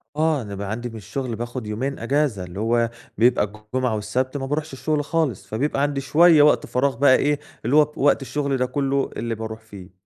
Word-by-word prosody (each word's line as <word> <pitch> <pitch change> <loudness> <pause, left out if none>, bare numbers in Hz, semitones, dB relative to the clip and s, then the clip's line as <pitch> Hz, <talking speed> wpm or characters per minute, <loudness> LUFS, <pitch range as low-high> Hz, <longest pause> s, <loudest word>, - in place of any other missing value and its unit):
آه، 155 -2 +1
أنا 100 -2 -7
بقى 100 0 -5
عندي 120 +2 -4
من 115 - -11
الشغل 115 +4 -4
باخد 120 -1 -5
يومين 130 +6 -3
أجازة، 125 -5 0
اللي 90 +2 -8
هو 115 +1 +1 0.3
بيبقى 120 -1 +4 0.3
الجمعة 125 -3 +1
والسبت 125 +6 -2
ما 135 - -4
باروحش 150 +1 -3
الشغل 150 +2 -1
خالص. 150 - -1
فبيبقى 140 +5 -1
عندي 145 -1 0
شوية 155 +3 +5
وقت 150 - +4
فراغ 135 +2 0
بقى 130 -1 +5
إيه، 145 +2 +1 0.3
اللي 125 +5 +2
هو 150 0 +5
وقت 145 0 +3
الشغل 140 0 -1
ده 125 - +1
كلّه 135 +1 -1
اللي 115 0 -2
باروح 110 0 -6
فيه. 100 -5 -13
130 Hz, 205 wpm, -23 LUFS, 110-145 Hz, 0.3 s, شوية